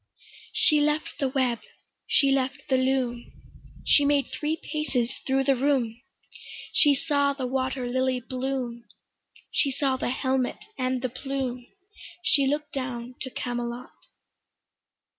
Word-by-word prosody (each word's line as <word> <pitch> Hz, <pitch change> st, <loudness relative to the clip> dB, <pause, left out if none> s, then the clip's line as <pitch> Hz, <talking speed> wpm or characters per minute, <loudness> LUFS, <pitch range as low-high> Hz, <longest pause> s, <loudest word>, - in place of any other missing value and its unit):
She 300 Hz, -2 st, +5 dB
left 300 Hz, +1 st, 0 dB
the 275 Hz, -, +1 dB
web, 255 Hz, -3 st, +1 dB, 0.5 s
she 275 Hz, -1 st, +4 dB
left 270 Hz, 0 st, -1 dB
the 265 Hz, -, +4 dB
loom; 255 Hz, -2 st, 0 dB, 0.5 s
She 290 Hz, -, +6 dB
made 285 Hz, -1 st, +2 dB
three 310 Hz, +1 st, -1 dB
paces 270 Hz, -7 st, -2 dB
thro' 270 Hz, 0 st, +3 dB
the 270 Hz, 0 st, +3 dB
room, 250 Hz, -3 st, +1 dB, 0.7 s
She 290 Hz, -2 st, +6 dB
saw 285 Hz, -1 st, +1 dB
the 270 Hz, -2 st, -4 dB
water 260 Hz, 0 st, -1 dB
lily 255 Hz, +1 st, +1 dB
bloom, 250 Hz, -2 st, -3 dB, 0.7 s
She 280 Hz, -, +2 dB
saw 270 Hz, -1 st, 0 dB
the 255 Hz, -, -1 dB
helmet 260 Hz, 0 st, 0 dB, 0.2 s
and 255 Hz, -1 st, -1 dB
the 255 Hz, -, 0 dB
plume, 255 Hz, -1 st, -4 dB, 0.6 s
She 280 Hz, -4 st, +4 dB
look'd 295 Hz, +1 st, -1 dB
down 255 Hz, -2 st, -4 dB
to 260 Hz, -, -4 dB
Camelot. 240 Hz, 0 st, -4 dB
265 Hz, 130 wpm, -27 LUFS, 250-280 Hz, 0.7 s, She